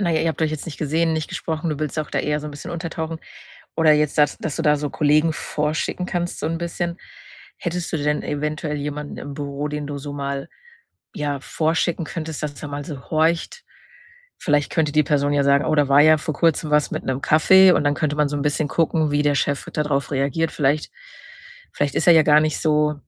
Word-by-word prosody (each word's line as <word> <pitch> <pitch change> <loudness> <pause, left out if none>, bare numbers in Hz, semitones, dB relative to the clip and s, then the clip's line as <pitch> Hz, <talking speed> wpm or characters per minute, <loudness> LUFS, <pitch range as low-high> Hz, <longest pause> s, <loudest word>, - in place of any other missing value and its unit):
Na 185 -4 +1
ja, 160 -1 +1
ihr 165 - +1
habt 160 - -4
euch 155 - +1
jetzt 155 - -5
nicht 165 - -7
gesehen, 160 +2 +1
nicht 155 -1 -2
gesprochen. 160 0 -3
Du 150 - -3
willst 155 0 -3
auch 155 - -2
da - - 0
eher 150 0 -1
so 150 - -7
'n - - -6
bisschen 145 - -8
untertauchen. 165 -1 -4 0.6
Oder 160 -1 +5
jetzt 150 -1 +1
dass 150 -1 +3
dass 155 - -4
du 165 - -2
da 150 -2 +4
so 145 0 -3
Kollegen 155 +2 +2
vorschicken 155 +4 -2
kannst 175 -1 -3
so - - -2
'n 165 +1 -1
bisschen, 170 0 -3 0.6
hättest 175 0 -4
du - - +1
denn 150 0 0
eventuell 150 +1 -3
jemanden 145 0 -5
im 145 - -7
Büro, 140 0 -4
den 150 0 -4
du 145 -1 -4
so 145 +1 -7
mal, 140 +1 -4 0.7
ja, 145 -2 -2
vorschicken 160 +3 -1
könntest, 160 -1 -6
dass 145 -1 -5
er 145 - -5
mal 145 0 -5
so 145 -3 -7
horcht? 165 - 0 0.7
Vielleicht 145 -1 +1
könnte 155 -3 0
die 155 0 +4
Person 145 -1 +1
ja 145 -1 +2
sagen: 140 0 +3
„Oh, 155 - +1
da 145 -2 +2
war 140 +1 +6
ja 155 +1 +6
vor 150 0 -4
Kurzem 160 -1 +1
was 150 -1 +2
mit - - -3
'nem 130 0 -2
Kaffee“, 185 +6 +6
und - - +2
dann 145 - +2
könnte 150 0 -1
man 150 -1 +2
so 145 - -3
'n 140 - -2
bisschen 150 +1 0
gucken, 160 -1 +1
wie 145 0 +1
der 145 -1 +2
Chef 140 0 -1
da 150 - 0
drauf 145 -1 -1
reagiert. 140 +4 0
Vielleicht 145 +1 0 0.8
vielleicht 145 -1 -1
ist - - +1
er 175 - +9
ja 160 -1 +6
gar 150 0 +5
nicht 155 -1 -1
so, 150 -1 +2
150 Hz, 230 wpm, -22 LUFS, 145-160 Hz, 0.8 s, er